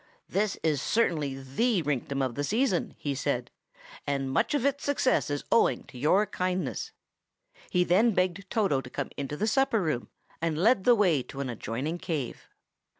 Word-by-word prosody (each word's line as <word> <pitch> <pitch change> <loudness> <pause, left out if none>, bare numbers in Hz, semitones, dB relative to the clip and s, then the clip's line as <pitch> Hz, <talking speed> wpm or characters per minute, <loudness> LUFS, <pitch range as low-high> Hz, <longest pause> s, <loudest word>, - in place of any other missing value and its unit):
"This 205 0 0
is 150 -4 +1
certainly 155 -11 +1
the 170 - 0
rinktum 140 -1 -1
of 130 - -3
the 145 - -2
season," 215 - 0
he 145 - -2
said, 130 -3 -2 0.6
"and 135 -2 -1
much 135 - +1
of 275 -3 0
its 280 0 0
success 275 - +1
is 145 0 -2
owing 230 - +3
to 125 - -13
your 185 +10 +4
kindness." 185 -6 -2 0.8
He 180 - +3
then 200 +5 +3
begged 185 +1 0
Toto 195 -12 +1
to 125 - -10
come - - -4
into 145 +1 -4
the 210 - 0
supper 265 0 +2
room, 155 -10 -2 0.3
and 165 -2 0
led 195 +3 +3
the 245 - +7
way 180 - +3
to 135 - -9
an 135 -3 -2
adjoining 130 +9 -4
cave. 150 -9 -4
165 Hz, 175 wpm, -28 LUFS, 140-210 Hz, 0.8 s, the